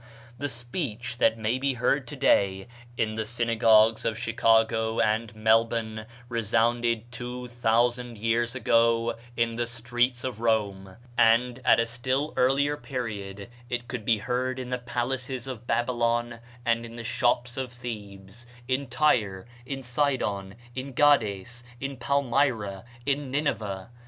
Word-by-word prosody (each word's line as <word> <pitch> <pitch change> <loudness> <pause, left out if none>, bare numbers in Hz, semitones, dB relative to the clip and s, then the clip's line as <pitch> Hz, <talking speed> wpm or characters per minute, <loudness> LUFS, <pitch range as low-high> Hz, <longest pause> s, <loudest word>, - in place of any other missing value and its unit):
The 145 - -2
speech 120 - -5
that 115 - +4
may 110 +3 0
be 135 0 0
heard 130 +3 +1
to 150 - -7
day 100 -7 +2 0.3
in 110 -2 0
the 110 0 -2
synagogues 115 -1 +3
of 110 -1 -1
Chicago 115 -1 +2
and 110 +1 +1
Melbourne 110 0 +1 0.2
resounded 115 0 +1
two 125 +1 -6
thousand 120 0 +1
years 115 +2 0
ago 115 -1 +3 0.2
in 115 0 +1
the 120 0 0
streets 120 +1 0
of 125 -4 -4
Rome; 100 -4 0 0.2
and, 120 +2 +4
at - - +5
a 115 - +3
still 130 +5 -1
earlier 140 +3 +2
period, 105 -8 -5 0.2
it 120 -1 -3
could 125 -3 -5
be 110 0 +3
heard 125 +4 -2
in 125 -1 -6
the 125 - -1
palaces 125 +1 -3
of 120 -3 -7
Babylon 120 -1 0 0.3
and 115 0 -1
the 115 - -6
shops 120 +1 0
of 130 -2 -4
Thebes 110 -2 -8 0.2
in 130 +2 0
Tyre, 120 -8 +1 0.2
in 135 -1 -4
Sidon, 120 -7 -1 0.2
in 130 +1 -5
Gades, 120 -6 +2 0.2
in 135 0 -4
Palmyra, 120 -6 0 0.2
in 140 -1 0
Nineveh. 110 -8 -2
120 Hz, 135 wpm, -27 LUFS, 110-125 Hz, 0.3 s, at